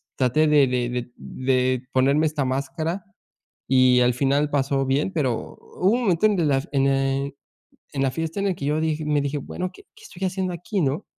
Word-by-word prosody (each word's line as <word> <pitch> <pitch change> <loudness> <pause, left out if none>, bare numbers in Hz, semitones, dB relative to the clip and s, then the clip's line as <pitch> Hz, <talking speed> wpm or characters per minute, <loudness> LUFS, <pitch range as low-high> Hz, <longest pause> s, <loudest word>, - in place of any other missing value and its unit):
traté 135 +4 +2
de 150 -2 +5
de 125 -1 -1
de 125 0 -4
de 130 -1 0
ponerme 140 +4 +3
esta 150 -2 -1
máscara 140 +8 -2 0.6
y 130 -1 +5
al 125 0 +3
final 140 +3 +1
pasó 135 -1 +1
bien, 140 +7 0
pero 135 -9 -2
hubo 185 - -1
un 245 +2 +1
momento 190 -1 +3
en 210 -3 +1
que 170 - +2
las 135 -2 0
en 135 -1 +2
el 135 0 0 0.6
en 135 -1 0
la 135 - +1
fiesta 165 +7 -3
en 200 - -1
el 190 - 0
que 140 - -6
yo 150 +2 +1
dije 155 -1 -1
me 150 -1 +2
dije: 140 +1 -2
"Bueno, 180 +6 -5
¿qué - - -15
qué - - -17
estoy 185 +2 -6
haciendo 185 -1 -2
aquí?", 180 +3 -3
¿no? 140 +2 -1
140 Hz, 210 wpm, -23 LUFS, 135-160 Hz, 0.6 s, de